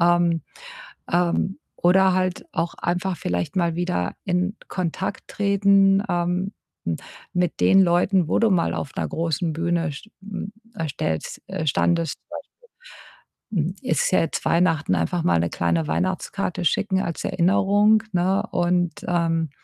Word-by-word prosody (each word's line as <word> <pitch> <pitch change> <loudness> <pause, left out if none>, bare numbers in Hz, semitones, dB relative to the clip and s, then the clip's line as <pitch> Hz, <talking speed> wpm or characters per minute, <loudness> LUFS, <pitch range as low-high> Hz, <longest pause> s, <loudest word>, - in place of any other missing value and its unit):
Ähm, 170 -1 +3 0.7
ähm, 175 +2 +1 0.2
oder 190 +1 +4
halt 185 -1 -1
auch 165 +1 -1
einfach 180 +2 -1
vielleicht 90 - -2
mal 170 -3 +1
wieder 175 - -1
in 180 +2 0
Kontakt 185 +2 -3
treten, 200 -1 +3
ähm, 180 +2 0 0.3
hm, 85 -1 -1 0.4
mit 180 -1 0
den 195 0 +6
Leuten, 180 0 +2
wo - - +2
du 230 - +4
mal 175 -3 +2
auf 135 - -4
'ner - - -1
großen 165 0 -1
Bühne 170 0 0
st 145 +10 -10
m 200 0 -6 0.2
äh, 165 -1 -2
stellst 80 - -3
äh, 155 - -4
standest, 165 +2 +1
zum - - -50 1.2
Beispiel. 170 -8 +1
Hm, - - -12
es 255 - +1
ist - - 0
ja 185 - +4
jetzt 165 - -3
Weihnachten, 165 - +2
einfach 85 - 0
mal 85 -1 +3
'ne 85 +1 0
kleine 85 -2 0
Weihnachtskarte 95 - -2
schicken 190 +3 +1
als 170 - -4
Erinnerung, 205 +4 +3
ne? 185 +2 +2
Und, 175 0 0
ähm, 165 -2 +1
175 Hz, 150 wpm, -23 LUFS, 165-190 Hz, 1.2 s, den